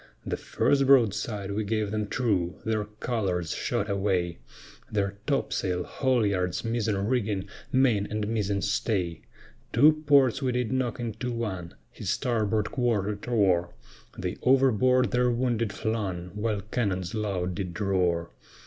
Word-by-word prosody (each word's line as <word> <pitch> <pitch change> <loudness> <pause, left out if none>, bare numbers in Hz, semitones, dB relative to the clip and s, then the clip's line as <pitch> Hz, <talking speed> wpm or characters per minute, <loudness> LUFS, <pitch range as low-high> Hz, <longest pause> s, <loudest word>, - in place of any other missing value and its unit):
The - - -1
first 140 -1 +1
broadside 105 -5 +3
we 105 +2 -1
gave 105 -1 -1
them 105 -1 -1
true, 100 -8 0
their 110 -1 0
colors 105 -6 -2
shot 105 - -1
away, 95 - 0 0.5
Their 100 -1 -1
topsail, 95 -10 0
haulyards, 105 - 0
mizen 110 -3 0
rigging, 105 -6 0 0.2
main 120 -6 +3
and 105 -1 -2
mizen 105 -3 -1
stay, 95 -5 -1 0.5
Two 155 +6 +5
ports 135 -2 +5
we 130 -2 0
did 125 -2 -1
knock 130 -2 -1
into 120 +1 -3
one, 95 -8 -4 0.2
his - - -6
starboard 110 -3 0
quarter 110 -5 0
tore, 95 -6 +1 0.4
They - - -3
overboard 130 -1 +4
their 125 0 +3
wounded 120 -3 0
flung, 100 -5 -3
while 105 -1 -1
cannons 95 -4 -2
loud 95 -4 -1
did 90 0 -5
roar. 90 -4 +1
105 Hz, 130 wpm, -27 LUFS, 95-120 Hz, 0.5 s, Two